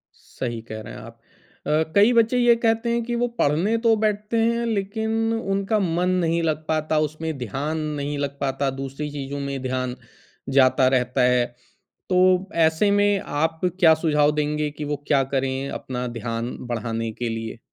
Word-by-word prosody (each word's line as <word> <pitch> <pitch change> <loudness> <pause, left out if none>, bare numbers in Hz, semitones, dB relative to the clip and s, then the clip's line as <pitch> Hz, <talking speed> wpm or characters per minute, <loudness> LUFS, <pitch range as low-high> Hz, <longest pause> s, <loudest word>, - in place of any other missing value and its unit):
सही 120 -3 -6
कह 110 -1 -8
रहे - - -9
हैं - - -9
आप। - - -12 0.5
अ, 155 +1 +3
कई 205 +4 +6
बच्चे 230 +1 +3
ये 240 -1 +5
कहते 230 0 +1
हैं 235 0 0
कि 240 +1 -3
वो 245 +1 +1
पढ़ने 170 +10 +2
तो 225 -1 +6
बैठते 210 +2 0
हैं 235 +1 +1
लेकिन 220 +2 -1
उनका 200 -1 0
मन 180 -1 0 0.2
नहीं 165 +1 +1
लग 155 -1 -1
पाता, 155 0 0
उसमें 155 0 -3
ध्यान 135 +7 -3 0.2
नहीं 145 +1 -3
लग 140 0 -3
पाता, 140 0 -1
दूसरी 135 +2 -5
चीज़ों 140 0 -5
में 140 -1 -4
ध्यान 130 -1 -2 0.5
जाता 130 -1 +4
रहता 125 +1 0
है। 125 -1 +3 0.6
तो 185 +1 +3 0.2
ऐसे 160 +6 +2
में, 205 0 +3
आप 160 0 -2 0.2
क्या 165 -3 +7
सुझाव 150 -2 +3
देंगे 150 0 0
कि 150 +1 -7
वो 150 0 -1
क्या 140 -2 +3
करें, 135 +1 -1
अपना 125 -1 -4
ध्यान 115 +1 -3
बढ़ाने 115 -1 -3
के 120 +1 -3
लिए? 115 0 -5
150 Hz, 175 wpm, -23 LUFS, 130-200 Hz, 0.6 s, क्या